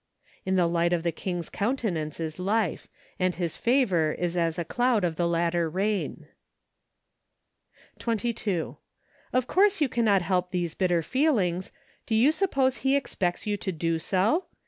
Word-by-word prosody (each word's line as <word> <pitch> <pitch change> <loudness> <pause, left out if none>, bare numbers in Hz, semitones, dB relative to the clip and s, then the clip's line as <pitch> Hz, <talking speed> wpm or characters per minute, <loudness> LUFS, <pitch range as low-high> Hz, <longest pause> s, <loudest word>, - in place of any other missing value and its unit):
" - - -32
In 190 - +2
the 180 -2 +4
light 170 +1 +1
of 170 -2 0
the 170 - +1
king's 175 0 -4
countenance 200 - -2
is 160 +1 -4
life; 205 0 0 0.3
and 185 -1 +1
his 170 -3 -2
favor 195 - +2
is 175 0 -2
as 165 -2 0
a 170 - -2
cloud 240 +2 +1
of 170 -2 0
the 170 +1 +1
latter 170 0 +1
rain." 195 +4 -2 1.7
22. 220 -6 -2 0.5
Of 255 -1 +1
course 400 +6 +3
you 295 - +3
cannot 220 -6 +2
help 180 0 0
these 175 -3 -2
bitter 175 -3 +1
feelings; 190 - +1 0.4
do 225 - +1
you 245 +7 +5
suppose 275 -8 +1
He 265 +4 +1
expects 180 -10 -1
you 205 -1 -1
to 195 - -3
do 165 -1 -1
so 200 - +1
185 Hz, 160 wpm, -27 LUFS, 170-235 Hz, 1.7 s, you